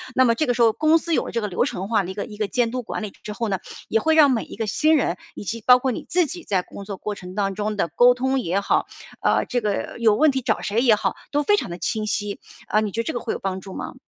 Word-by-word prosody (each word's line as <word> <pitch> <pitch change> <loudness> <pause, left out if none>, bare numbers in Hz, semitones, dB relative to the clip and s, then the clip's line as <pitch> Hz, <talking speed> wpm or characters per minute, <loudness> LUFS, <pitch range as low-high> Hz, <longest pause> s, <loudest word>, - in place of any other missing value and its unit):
那 260 - +5
么 230 - +4
这 310 - +1
个 245 - +2
时 240 - 0
候 225 -2 +5
公 310 +1 +4
司 335 +1 -3
有 - - +1
了 - - -5
这 230 - -1
个 210 - -2
流 180 - 0
程 190 +2 -3
化 215 -3 +2
的 180 - -6
一 - - -6
个 205 - -3
一 210 -3 -11
个 210 -2 -1
监 230 +3 0
督 255 - -2
管 - - -5
理 210 - -5
之 210 - -6
后 230 0 -2
呢， 190 -2 -1 0.3
也 225 - +2
会 320 +4 +2
让 295 -3 +7
每 235 - 0
一 - - -10
个 225 - -2
新 310 +10 +3
人 180 - 0 0.2
以 - - -7
及 225 +3 -4
包 250 0 +8
括 260 +1 0
你 - - -5
自 355 0 +3
己 335 +3 -7
在 190 -9 0
工 200 - -10
作 200 -2 -6
过 210 - -4
程 180 -1 -10
当 195 -1 0
中 210 +2 -2
的 170 - +1
沟 245 +10 +5
通 265 +1 0
也 190 -4 0
好， 200 - +1 0.3
啊， - - +2
这 245 -1 -2
个 210 +2 -2
有 220 -3 +4
问 305 +7 +4
题 265 0 -2
找 230 -3 0
谁 215 +3 0
也 240 -4 +5
好 210 - -1 0.2
都 290 0 +1
非 415 +6 +3
常 - - -3
地 175 - -6
清 215 +5 -2
晰， 205 -1 -2 0.3
啊， 215 - +2
你 215 -1 -1
觉 230 - -1
得 - - -5
这 - - -3
个 240 - -2
会 230 - -3
有 - - -5
帮 190 -1 -3
助 190 0 -10
吗？ - - -6
225 Hz, 345 characters per minute, -23 LUFS, 200-255 Hz, 0.3 s, 包